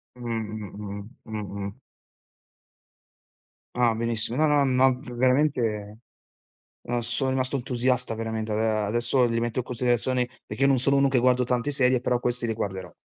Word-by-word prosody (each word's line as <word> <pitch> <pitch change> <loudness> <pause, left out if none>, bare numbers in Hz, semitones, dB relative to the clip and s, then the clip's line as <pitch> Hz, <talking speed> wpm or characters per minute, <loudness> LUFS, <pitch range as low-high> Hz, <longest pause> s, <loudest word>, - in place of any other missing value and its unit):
Mh, 125 - -14
mh, 110 -3 -5
mh, 100 0 -7 0.2
mh, 100 -2 -5
mh. 100 +6 -8 2.0
Ah, 120 -2 +3
benissimo. 115 0 0
No 155 +2 +3
no 145 -1 +4
no 130 -1 +3
ve 125 -3 -10
veramente, 120 -5 +1 0.8
uhm, 120 0 -2
sono 120 +3 0
rimasto 130 +1 -1
entusiasta 125 -1 0
veramente. 110 -1 -3
Ade 110 +1 +1
adesso 115 +4 +1
li 115 - -1
rimetto 120 +1 -1
in - - -1
considerazione, 125 +1 0 0.2
perché 135 - -1
non 135 -2 +4
sono 135 +3 +4
uno 140 0 +4
che 135 -2 +2
guardo 125 +1 +3
tante 125 +1 -1
serie, 130 -3 +3
però 125 -1 0
questi 120 -1 -1
li 115 - 0
guarderò. 95 -4 -5
120 Hz, 160 wpm, -25 LUFS, 110-130 Hz, 2.0 s, no